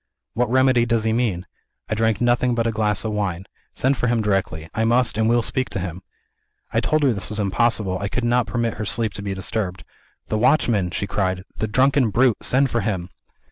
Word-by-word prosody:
'What 120 Hz, -1 st, 0 dB
remedy 130 Hz, -1 st, +3 dB
does 115 Hz, -1 st, +1 dB
he 110 Hz, 0 st, +1 dB
mean? 110 Hz, -7 st, -1 dB, 0.4 s
I -, -, -2 dB
drank 110 Hz, -1 st, +1 dB
nothing 120 Hz, 0 st, +2 dB
but 115 Hz, -1 st, 0 dB
a 115 Hz, -, +1 dB
glass 105 Hz, -1 st, 0 dB
of 110 Hz, -, -1 dB
wine. 95 Hz, -4 st, -2 dB, 0.3 s
Send 135 Hz, +1 st, 0 dB
for 125 Hz, -, 0 dB
him 120 Hz, -1 st, +1 dB
directly 95 Hz, -7 st, -1 dB
I 110 Hz, -, 0 dB
must, 120 Hz, +1 st, +2 dB
and 110 Hz, +1 st, +1 dB
will 120 Hz, 0 st, +3 dB
speak 130 Hz, +3 st, -1 dB
to -, -, -4 dB
him!' 90 Hz, 0 st, -5 dB, 0.7 s
I -, -, +3 dB
told 155 Hz, 0 st, +1 dB
her 135 Hz, -4 st, +4 dB
this 100 Hz, -, -3 dB
was 105 Hz, 0 st, -4 dB
impossible; 100 Hz, -2 st, +1 dB
I 100 Hz, -, -2 dB
could 125 Hz, +5 st, -3 dB
not 120 Hz, -1 st, +2 dB
permit 115 Hz, -1 st, -2 dB
his 105 Hz, 0 st, -2 dB
sleep 110 Hz, -3 st, +1 dB
to 100 Hz, -, -7 dB
be 100 Hz, -1 st, -4 dB
disturbed. 95 Hz, -2 st, -3 dB, 0.4 s
'The 110 Hz, -, -2 dB
watchman!' 115 Hz, -7 st, +2 dB
she 90 Hz, -, -3 dB
cried; 95 Hz, -2 st, -1 dB
'the 110 Hz, -, -2 dB
drunken 130 Hz, +2 st, +3 dB
brute! 120 Hz, +2 st, +3 dB
send 135 Hz, +1 st, +2 dB
for 120 Hz, -, 0 dB
him.' 95 Hz, -4 st, -3 dB
110 Hz, 220 wpm, -22 LUFS, 100-120 Hz, 0.7 s, her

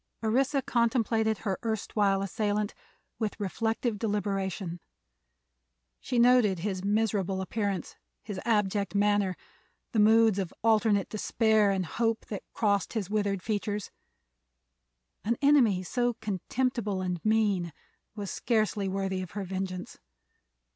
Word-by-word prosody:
Orissa 265 Hz, +5 st, +2 dB
contemplated 230 Hz, -3 st, +1 dB
her 195 Hz, -2 st, -1 dB
erstwhile 205 Hz, -3 st, 0 dB
assailant 205 Hz, +1 st, -1 dB, 0.5 s
with 220 Hz, -1 st, -2 dB
reflective 225 Hz, +2 st, -1 dB
deliberation. 195 Hz, -4 st, -2 dB, 1.2 s
She 250 Hz, -, -3 dB
noted 235 Hz, -5 st, +5 dB
his 185 Hz, +1 st, -3 dB
miserable 200 Hz, -2 st, 0 dB
appearance, 195 Hz, -2 st, -2 dB, 0.3 s
his 205 Hz, -3 st, -5 dB
abject 205 Hz, -3 st, 0 dB
manner, 205 Hz, -2 st, +2 dB, 0.5 s
the 225 Hz, -, +1 dB
moods 220 Hz, -1 st, +5 dB
of 185 Hz, -3 st, -2 dB
alternate 215 Hz, -3 st, +3 dB
despair 220 Hz, -1 st, +2 dB
and 190 Hz, -2 st, 0 dB
hope 225 Hz, +5 st, -1 dB
that 205 Hz, -, -4 dB
crossed 200 Hz, -3 st, 0 dB
his 205 Hz, -4 st, -3 dB
withered 205 Hz, -3 st, 0 dB
features. 205 Hz, -1 st, -2 dB, 1.3 s
An 230 Hz, +2 st, 0 dB
enemy 255 Hz, -10 st, +4 dB
so 245 Hz, +5 st, 0 dB
contemptible 215 Hz, 0 st, -2 dB
and 180 Hz, -2 st, -3 dB
mean 210 Hz, -6 st, +2 dB, 0.4 s
was 205 Hz, -3 st, -5 dB
scarcely 215 Hz, -4 st, 0 dB
worthy 190 Hz, -1 st, -2 dB
of 180 Hz, -3 st, -8 dB
her 200 Hz, -, -2 dB
vengeance. 185 Hz, -1 st, -5 dB
210 Hz, 115 wpm, -29 LUFS, 195-225 Hz, 1.3 s, noted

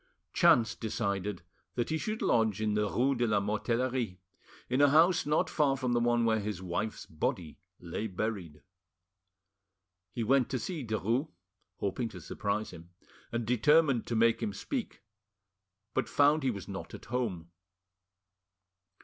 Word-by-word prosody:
Chance 115 Hz, -1 st, +5 dB
decided 100 Hz, -4 st, -3 dB, 0.3 s
that 120 Hz, -1 st, -1 dB
he 160 Hz, -, 0 dB
should 215 Hz, +5 st, -3 dB
lodge 110 Hz, -3 st, +2 dB
in 110 Hz, -1 st, 0 dB
the 105 Hz, -1 st, +1 dB
rue 130 Hz, +6 st, +2 dB
de 120 Hz, -2 st, 0 dB
la 105 Hz, -2 st, +3 dB
Mortellerie, 115 Hz, +1 st, -1 dB, 0.5 s
in 130 Hz, +3 st, +1 dB
a 145 Hz, -, +7 dB
house 165 Hz, +5 st, +4 dB
not 150 Hz, +1 st, +2 dB
far 140 Hz, -3 st, +1 dB
from 125 Hz, -2 st, -1 dB
the 120 Hz, -, +3 dB
one 120 Hz, 0 st, +2 dB
where 110 Hz, -1 st, +2 dB
his 105 Hz, -3 st, -4 dB
wife's 95 Hz, +4 st, -3 dB
body 80 Hz, 0 st, -3 dB, 0.2 s
lay 90 Hz, +5 st, -4 dB
buried. 95 Hz, -7 st, -4 dB, 1.5 s
He 115 Hz, -, -3 dB
went 130 Hz, +2 st, +3 dB
to 130 Hz, -, -1 dB
see 160 Hz, +3 st, -4 dB
Derues, 115 Hz, -, 0 dB, 0.5 s
hoping 105 Hz, +4 st, -2 dB
to 90 Hz, -, -10 dB
surprise 100 Hz, +5 st, -3 dB
him, 85 Hz, -1 st, -12 dB, 0.4 s
and 115 Hz, -1 st, -2 dB
determined 135 Hz, +2 st, +3 dB
to 120 Hz, -, -2 dB
make 115 Hz, 0 st, +3 dB
him 210 Hz, -2 st, -2 dB
speak, 250 Hz, -, -5 dB, 0.9 s
but 115 Hz, -, -1 dB
found 145 Hz, +5 st, +4 dB
he 135 Hz, -, +1 dB
was 100 Hz, -6 st, -5 dB
not -, -, -7 dB
at -, -, -12 dB
home. 105 Hz, -9 st, -3 dB
115 Hz, 150 wpm, -31 LUFS, 100-130 Hz, 1.5 s, a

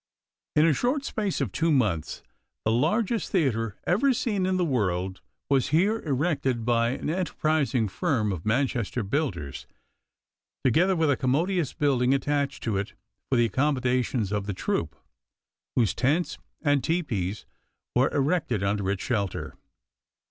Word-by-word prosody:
In 150 Hz, -, +5 dB
the 165 Hz, -, +4 dB
short 265 Hz, -, 0 dB
space 205 Hz, -7 st, -2 dB
of -, -, -1 dB
two 165 Hz, 0 st, +1 dB
months 105 Hz, -, 0 dB, 0.4 s
the 110 Hz, -, +3 dB
largest 210 Hz, -, +1 dB
theater 115 Hz, -, +1 dB
ever 255 Hz, +9 st, +3 dB
seen 205 Hz, -6 st, 0 dB
in 185 Hz, 0 st, +1 dB
the 180 Hz, -, +1 dB
world 95 Hz, -, -1 dB, 0.3 s
was 135 Hz, -2 st, +2 dB
here 195 Hz, +9 st, +2 dB
erected 140 Hz, -, -1 dB
by 115 Hz, -1 st, +2 dB
an 130 Hz, -, -3 dB
enterprising 155 Hz, -7 st, 0 dB
firm 115 Hz, -, 0 dB
of 85 Hz, -4 st, -4 dB
Manchester 120 Hz, 0 st, 0 dB
builders, 95 Hz, -, -3 dB, 1.0 s
together 175 Hz, +9 st, +3 dB
with 160 Hz, -3 st, +2 dB
a -, -, +3 dB
commodious 155 Hz, +5 st, 0 dB
building 135 Hz, -3 st, +2 dB
attached 140 Hz, 0 st, -1 dB
to 110 Hz, -4 st, 0 dB
it 100 Hz, +1 st, -3 dB, 0.4 s
for 135 Hz, -, +2 dB
the 120 Hz, -1 st, +4 dB
accommodation 130 Hz, 0 st, +1 dB
of 105 Hz, -1 st, -2 dB
the 100 Hz, -, -3 dB
troupe, -, -, -2 dB, 0.8 s
whose 115 Hz, -7 st, +3 dB
tents 150 Hz, +7 st, 0 dB, 0.2 s
and 145 Hz, -3 st, +2 dB
tepees 110 Hz, -, -1 dB, 0.5 s
were -, -, +3 dB
erected 140 Hz, -, 0 dB
under 100 Hz, -1 st, 0 dB
its 100 Hz, -2 st, -2 dB
shelter. 100 Hz, -6 st, -2 dB
135 Hz, 140 wpm, -26 LUFS, 110-165 Hz, 1.0 s, In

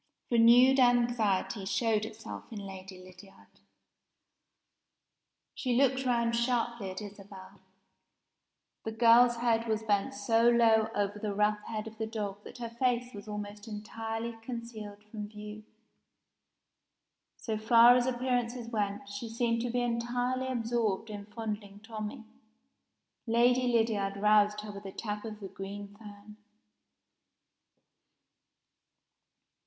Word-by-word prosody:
Renewed 245 Hz, +3 st, +6 dB
anxiety 235 Hz, -5 st, +2 dB
showed 215 Hz, +2 st, +1 dB
itself 220 Hz, +2 st, -9 dB
in 220 Hz, -, -6 dB
Lady 190 Hz, -1 st, -9 dB
Lydiard. 185 Hz, +2 st, -16 dB, 1.9 s
She 250 Hz, -3 st, -1 dB
looked 265 Hz, 0 st, +2 dB
round 235 Hz, -1 st, +2 dB
sharply 235 Hz, -3 st, 0 dB
at 190 Hz, +3 st, -6 dB
Isabel. 195 Hz, -1 st, -11 dB, 1.2 s
The 220 Hz, -, -4 dB
girl's 235 Hz, +1 st, +6 dB
head 230 Hz, -1 st, +1 dB
was 220 Hz, 0 st, -1 dB
bent 215 Hz, +5 st, 0 dB
so 235 Hz, -3 st, +3 dB
low 225 Hz, -2 st, +4 dB
over 205 Hz, 0 st, -1 dB
the 205 Hz, -1 st, -3 dB
rough 210 Hz, 0 st, +2 dB
head 215 Hz, -1 st, -4 dB
of 220 Hz, 0 st, -10 dB
the 220 Hz, -, -2 dB
dog 205 Hz, -2 st, -5 dB
that -, -, -10 dB
her 235 Hz, -1 st, -5 dB
face 245 Hz, 0 st, 0 dB
was 205 Hz, 0 st, -9 dB
almost 210 Hz, 0 st, -6 dB
entirely 225 Hz, +2 st, -5 dB
concealed 225 Hz, -4 st, -7 dB
from 210 Hz, 0 st, -7 dB
view. 210 Hz, 0 st, -9 dB, 1.7 s
So 220 Hz, -, -3 dB
far 235 Hz, +2 st, +7 dB
as 250 Hz, 0 st, +2 dB
appearances 245 Hz, -1 st, -1 dB
went, 205 Hz, -3 st, -2 dB
she 205 Hz, +3 st, -6 dB
seemed 230 Hz, 0 st, 0 dB
to 245 Hz, -, -2 dB
be 245 Hz, +1 st, 0 dB
entirely 245 Hz, +2 st, -1 dB
absorbed 230 Hz, -4 st, -1 dB
in 205 Hz, -1 st, -7 dB
fondling 210 Hz, -2 st, -6 dB
Tommie. 220 Hz, +2 st, -6 dB, 1.0 s
Lady 245 Hz, +2 st, +3 dB
Lydiard 220 Hz, -4 st, +1 dB
roused 210 Hz, 0 st, +4 dB
her 210 Hz, 0 st, -7 dB
with 200 Hz, 0 st, -10 dB
a 195 Hz, -, -6 dB
tap 210 Hz, +1 st, -5 dB
of 215 Hz, -1 st, -7 dB
the 200 Hz, -, -6 dB
green 200 Hz, +1 st, -8 dB
fan. 210 Hz, 0 st, -13 dB
220 Hz, 125 wpm, -30 LUFS, 205-235 Hz, 1.9 s, far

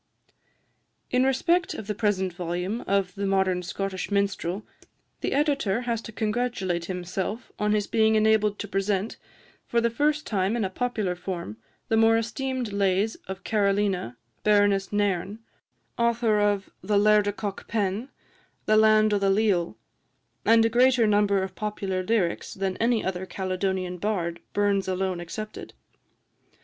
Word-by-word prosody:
In 255 Hz, +1 st, +3 dB
respect 335 Hz, +7 st, +1 dB
of 220 Hz, -, -6 dB
the 210 Hz, -, -2 dB
present 195 Hz, -4 st, 0 dB
volume 180 Hz, +5 st, -3 dB
of 195 Hz, -2 st, +1 dB
"The 200 Hz, +1 st, -3 dB
Modern 190 Hz, -2 st, +1 dB
Scottish 190 Hz, +1 st, -4 dB
Minstrel," 200 Hz, -1 st, -1 dB, 0.6 s
the -, -, -2 dB
Editor 275 Hz, -7 st, +1 dB
has 235 Hz, -2 st, -2 dB
to 230 Hz, -, -9 dB
congratulate 210 Hz, -5 st, -1 dB
himself 185 Hz, +5 st, -4 dB
on 210 Hz, 0 st, +2 dB
his 210 Hz, -1 st, +1 dB
being 220 Hz, 0 st, +3 dB
enabled 215 Hz, -1 st, +3 dB
to 205 Hz, -, -5 dB
present, 195 Hz, +1 st, -1 dB, 0.5 s
for 235 Hz, -, +2 dB
the 235 Hz, 0 st, +1 dB
first 300 Hz, +5 st, +1 dB
time 195 Hz, +1 st, 0 dB
in 220 Hz, -, 0 dB
a 190 Hz, -, -3 dB
popular 215 Hz, -4 st, -1 dB
form, 175 Hz, -, -5 dB, 0.3 s
the 225 Hz, -, +2 dB
more 225 Hz, 0 st, +5 dB
esteemed 245 Hz, 0 st, -3 dB
lays 200 Hz, +2 st, +1 dB
of 190 Hz, +1 st, -7 dB
Carolina, 200 Hz, -, 0 dB, 0.3 s
Baroness 205 Hz, -2 st, +3 dB
Nairn, 205 Hz, -1 st, 0 dB, 0.6 s
author 235 Hz, -2 st, +2 dB
of 205 Hz, -1 st, 0 dB
"The 205 Hz, +2 st, +1 dB
Laird 210 Hz, 0 st, +4 dB
o' -, -, +2 dB
Cockpen," 205 Hz, +2 st, -3 dB, 0.6 s
"The 215 Hz, -, +4 dB
Land 215 Hz, 0 st, +5 dB
o' 205 Hz, -, +2 dB
the 195 Hz, 0 st, +2 dB
Leal," 195 Hz, -4 st, +1 dB, 0.7 s
and 225 Hz, 0 st, +5 dB
a -, -, +3 dB
greater 245 Hz, 0 st, +4 dB
number 205 Hz, -2 st, +3 dB
of 190 Hz, -1 st, -5 dB
popular 195 Hz, -2 st, -3 dB
lyrics 185 Hz, -3 st, -1 dB
than 190 Hz, -1 st, -2 dB
any 230 Hz, -1 st, +1 dB
other 190 Hz, 0 st, -3 dB
Caledonian 185 Hz, -1 st, -2 dB
bard, 170 Hz, -4 st, -2 dB
Burns 200 Hz, -1 st, +1 dB
alone 185 Hz, -1 st, -1 dB
excepted. 215 Hz, +5 st, -7 dB
205 Hz, 145 wpm, -26 LUFS, 190-220 Hz, 0.7 s, more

